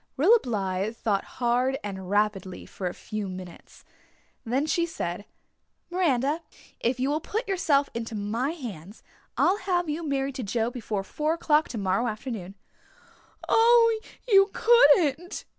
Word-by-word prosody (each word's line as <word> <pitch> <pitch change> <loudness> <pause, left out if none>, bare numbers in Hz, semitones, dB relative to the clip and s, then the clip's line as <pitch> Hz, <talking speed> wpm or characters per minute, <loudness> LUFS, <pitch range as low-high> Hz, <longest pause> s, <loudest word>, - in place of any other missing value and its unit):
Rilla 410 - +6
Blythe 200 - -2
thought 200 -3 0
hard 250 +2 +1
and 190 -3 -6
rapidly 205 -2 -1
for 185 - -5
a 175 - -3
few 215 -2 -5
minutes. 185 -2 -11 0.6
Then 260 +5 0
she 340 +2 +1
said, 180 - -5 0.7
"Miranda, 305 -4 +1 0.4
if 250 +2 0
you 265 +2 +1
will 305 +2 -1
put 445 +8 -3
yourself 310 -8 +2
into 230 -1 -5
my 220 +6 -1
hands 215 - -8 0.3
I'll 390 - +3
have 360 -4 -1
you 305 +3 -2
married 275 -3 -2
to 255 - -3
Joe 225 +3 -1
before 215 -5 -4
four 305 +9 -1
o'clock 310 -2 +2
tomorrow 205 +1 -1
afternoon." 215 -4 -5 0.9
"Oh, 460 -1 +5 0.3
you 390 -3 +6
couldn't." 355 - +4
255 Hz, 140 wpm, -26 LUFS, 205-325 Hz, 0.9 s, Rilla